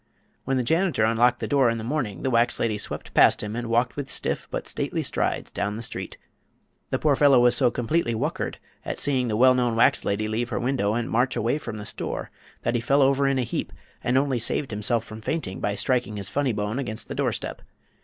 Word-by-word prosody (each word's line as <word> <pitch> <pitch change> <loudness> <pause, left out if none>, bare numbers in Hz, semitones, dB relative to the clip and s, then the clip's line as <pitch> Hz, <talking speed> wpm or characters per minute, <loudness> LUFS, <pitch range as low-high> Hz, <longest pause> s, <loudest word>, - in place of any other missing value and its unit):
When 135 0 0
the 125 - +1
janitor 160 - +1
unlocked 115 +2 +3
the - - -2
door 135 -4 +3
in 115 - -1
the 110 - -5
morning 115 - -3
the 130 - 0
wax 115 0 +2
lady 110 -2 0
swept - - -4
past - - +5
him 105 +1 -4
and 120 -1 -4
walked 120 +2 +1
with 145 -2 -5
stiff - - -2
but - - -4
stately - - -2
strides - - -1
down 100 0 -2
the 115 - -5
street. - - -5 0.7
The - - 0
poor 150 -3 +2
fellow 140 -2 +6
was 120 0 +5
so 125 -2 +4
completely 120 +1 0
whuckered - - -2 0.3
at - - -4
seeing 130 -3 +1
the 105 -2 -1
well 130 +2 +6
known 125 -2 +1
wax 115 - +4
lady 105 +2 -1
leave 115 +2 -2
her 115 - -2
window 120 -4 0
and 120 0 -1
march 125 +3 +1
away 120 +7 0
from 115 -7 -6
the 105 - -7
store - - -4 0.3
that - - 0
he 120 - 0
fell 135 +4 +3
over 140 +1 +3
in 135 -1 +1
a 130 - +1
heap - - -3 0.3
and 125 +2 +2
only 135 -2 +1
saved 125 +3 -1
himself 110 +2 0
from 110 -1 -10
fainting 110 - -3
by 100 +4 -1
striking 120 -1 0
his 100 -2 -5
funny 140 -2 0
bone 105 +3 -2
against 110 -4 -5
the - - -5
doorstep. - - -2
120 Hz, 230 wpm, -25 LUFS, 110-135 Hz, 0.7 s, fellow